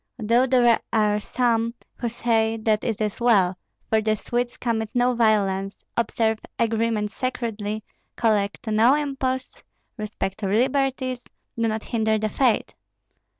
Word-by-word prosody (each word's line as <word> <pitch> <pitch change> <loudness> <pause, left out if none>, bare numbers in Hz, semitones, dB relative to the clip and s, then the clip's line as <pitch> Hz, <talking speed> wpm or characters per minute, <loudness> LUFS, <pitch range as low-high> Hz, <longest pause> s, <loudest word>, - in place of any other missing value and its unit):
Though 235 +3 +2
there 245 -3 +4
are 210 -2 +2
some 230 +1 0 0.2
who 240 - -2
say 225 -1 +1
that 215 -1 +1
it 225 -3 -2
is 210 +1 -2
well; 195 -6 +4 0.3
for 220 0 +2
the 215 0 +1
Swedes 240 +3 -3
commit 220 -3 -1
no 245 +1 +3
violence, 200 -4 +1
observe 220 -1 0 0.2
agreements 225 -2 0
sacredly, 220 -4 -3 0.3
collect 210 -3 0
no 225 +5 +4
imposts, 265 -3 -3 0.4
respect 210 -2 -4
liberties, 255 +4 0 0.3
do 230 -1 0
not 220 -1 -2
hinder 220 -2 +1
the 215 0 -1
faith. 245 -2 +1
225 Hz, 130 wpm, -24 LUFS, 215-245 Hz, 0.4 s, there